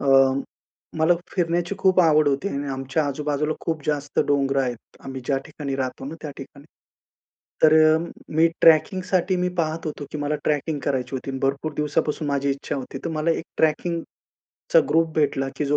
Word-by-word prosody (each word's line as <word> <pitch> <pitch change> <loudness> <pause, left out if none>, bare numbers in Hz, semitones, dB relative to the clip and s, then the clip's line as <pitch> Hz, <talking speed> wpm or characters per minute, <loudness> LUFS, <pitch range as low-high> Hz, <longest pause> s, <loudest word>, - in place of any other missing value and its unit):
अ, 140 - -2 0.9
मला 165 +2 +4 0.2
फिरण्याची 175 +1 0
खूप 190 -1 +4
आवड 155 -3 +4
होती 140 +8 0
आणि 140 -3 -3
आमच्या 135 +3 -1
आजू-बाजूला 150 +2 -1
खूप 160 -3 -3
जास्त 145 -1 -2
डोंगरं 140 -1 +2
आहेत. 120 -3 -6
आम्ही 135 -1 -6
ज्या 135 -2 +1
ठिकाणी 145 -3 -5
राहतो 130 -1 -3
ना, 150 - -6
त्या 150 - -5
ठिकाणी. 140 +1 -11 1.0
तर 155 0 +7 0.2
अ, - - +3 0.4
मी 165 +1 +5
ट्रॅकिंगसाठी 185 +3 +3
मी 180 0 0
पाहत 160 +1 -2
होतो 150 -1 -5
की 150 - -4
मला 145 +1 -1
ट्रॅकिंग 150 0 0
करायची 130 -1 -1
होती. 135 +1 -5
भरपूर 140 +3 -1
दिवसापासून 150 0 -1
माझी 140 0 0
इच्छा 140 +1 -3
होती. 135 0 -6
तर 165 - -2
मला 155 +2 +1
एक 165 - -1
ट्रॅकिंगचा 170 - -1
ग्रुप 165 0 +3
भेटला, 140 -3 +1
की - - -1
जो 145 +1 +2
150 Hz, 170 wpm, -23 LUFS, 140-165 Hz, 1.0 s, तर